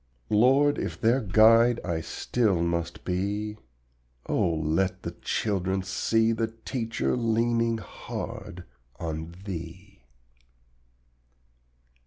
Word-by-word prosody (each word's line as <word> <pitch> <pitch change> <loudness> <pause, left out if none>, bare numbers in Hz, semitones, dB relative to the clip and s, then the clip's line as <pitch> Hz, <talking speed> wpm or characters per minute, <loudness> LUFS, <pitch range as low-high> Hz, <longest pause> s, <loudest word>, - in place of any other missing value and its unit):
Lord, 135 +7 +4
if - - -4
their 120 +3 +3
guide 115 +4 +5
I 85 -2 -1
still 105 +2 0
must 85 0 -2
be, 100 +4 -2 0.7
Oh 85 - +1
let 80 +4 0
the - - -3
little - - -16
children 95 -2 -1
see 115 +4 +1
The 115 0 0 0.2
teacher 115 -4 -1
leaning 115 0 +1
hard 90 -4 -7 0.4
on 80 0 -5
Thee. 95 +2 -8
105 Hz, 100 wpm, -27 LUFS, 90-115 Hz, 0.7 s, guide